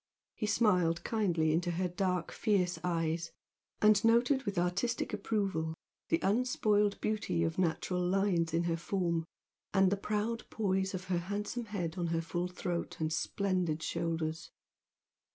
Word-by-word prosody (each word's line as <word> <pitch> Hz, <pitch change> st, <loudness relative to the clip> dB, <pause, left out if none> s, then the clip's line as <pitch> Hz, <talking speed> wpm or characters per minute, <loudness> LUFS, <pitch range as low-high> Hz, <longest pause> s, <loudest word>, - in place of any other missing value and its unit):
He 215 Hz, -, -3 dB
smiled 180 Hz, -7 st, +2 dB
kindly 170 Hz, -8 st, +1 dB
into 175 Hz, +2 st, +1 dB
her 180 Hz, +2 st, 0 dB
dark 180 Hz, -1 st, -1 dB
fierce 180 Hz, -6 st, +1 dB
eyes, 165 Hz, -1 st, -1 dB, 0.5 s
and 215 Hz, 0 st, +6 dB
noted 245 Hz, +4 st, +4 dB
with 200 Hz, -3 st, -3 dB
artistic 195 Hz, +8 st, 0 dB
approval 195 Hz, -6 st, -1 dB, 0.3 s
the 165 Hz, -, +4 dB
unspoiled 210 Hz, -2 st, +2 dB
beauty 210 Hz, -6 st, 0 dB
of 165 Hz, +1 st, -1 dB
natural 180 Hz, +1 st, 0 dB
lines 180 Hz, -2 st, +1 dB
in 165 Hz, +1 st, +1 dB
her 170 Hz, -1 st, 0 dB
form, 170 Hz, -2 st, -1 dB, 0.5 s
and 190 Hz, -1 st, +5 dB
the 200 Hz, -, +1 dB
proud 215 Hz, +3 st, -2 dB
poise 190 Hz, -2 st, 0 dB
of 180 Hz, -, -5 dB
her 180 Hz, -2 st, 0 dB
handsome 205 Hz, +6 st, -3 dB
head 180 Hz, -5 st, -3 dB
on 175 Hz, -, 0 dB
her 165 Hz, 0 st, 0 dB
full 175 Hz, +1 st, -2 dB
throat 175 Hz, -1 st, -4 dB
and 160 Hz, -1 st, 0 dB
splendid 180 Hz, -4 st, 0 dB
shoulders. 165 Hz, -1 st, -2 dB
180 Hz, 145 wpm, -32 LUFS, 170-205 Hz, 0.5 s, and